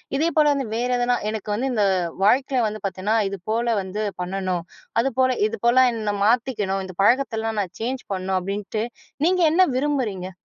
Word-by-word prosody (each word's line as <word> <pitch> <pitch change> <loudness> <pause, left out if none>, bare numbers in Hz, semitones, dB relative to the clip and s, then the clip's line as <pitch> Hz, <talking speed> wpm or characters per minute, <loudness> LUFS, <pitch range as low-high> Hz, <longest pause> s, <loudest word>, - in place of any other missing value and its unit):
இதே 310 +4 +2
போல் 305 -1 +5
வந்து 280 -2 -1
வேறு 245 +2 -1
எதனா 245 0 +2
எனக்கு 215 -1 -5
வந்து 255 +6 -1
இந்த 215 -4 +2 0.4
வாழ்க்கையில 255 +3 +3
வந்து 215 0 -6
பார்த்தேன்னா 195 +3 -1
இதுபோல 220 +5 -1
வந்து 195 +3 -4 0.2
பண்ணணும். 185 -1 -2 0.4
அதுபோல 260 0 +1
இதுபோல 260 - +3
என்னை 215 -2 -2
மாத்திக்கணும் 215 -5 +1
"இந்த 185 -1 -10
பழக்கத்தலாம் 225 -3 +1
நான் 190 0 -6
சேஞ்ச் 255 +3 -3
பண்ணணும்." 190 0 -1
அப்படின்ட்டு 205 +3 -3 0.4
நீங்க 360 +1 +3
என்ன 370 +3 +5
விரும்புறீங்க? 235 -10 -1
225 Hz, 155 wpm, -23 LUFS, 195-260 Hz, 0.4 s, போல்